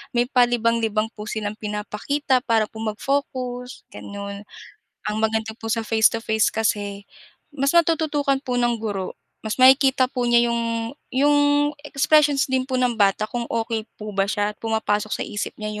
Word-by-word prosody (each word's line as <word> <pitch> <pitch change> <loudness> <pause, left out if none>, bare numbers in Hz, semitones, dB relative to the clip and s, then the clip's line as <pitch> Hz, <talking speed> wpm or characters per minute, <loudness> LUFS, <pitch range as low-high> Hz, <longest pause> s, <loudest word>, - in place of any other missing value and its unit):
may 240 - +4
palibang-libang 230 -3 +2
po 210 0 -9
silang 210 -1 -3
pinapakita 220 +6 -1
para 225 -4 +2
po 220 - -11
mag-focus, 250 +2 -3
gano'n. 200 0 -7 0.7
Ang 210 - -2
maganda 220 0 0
po 225 - -6
sa 230 - 0
face 220 0 +3
to 230 - -2
face 220 0 +2
kasi 205 -2 -1 0.5
mas 275 -1 0
natututukan 315 -4 +2
po 250 - -2
ng 240 -1 +2
guro, 200 -4 -4 0.3
mas 215 -1 -2
makikita 265 0 +6
po 250 - -2
niya 240 0 +4
yung 230 0 -2 0.2
yung 290 +3 +3 0.5
expressions 290 0 +3
din 260 -1 +2
po 260 - -1
ng 250 -1 +1
bata 200 +1 +3
kung 240 -1 -3
okey 225 -1 -1 0.2
po 215 0 -6
ba 195 0 +2
siya 205 -1 0
at - - -44
pumapasok 215 -2 -1
sa - - -3
isip 210 - -4
niya 215 0 -5
230 Hz, 165 wpm, -22 LUFS, 215-255 Hz, 0.7 s, makikita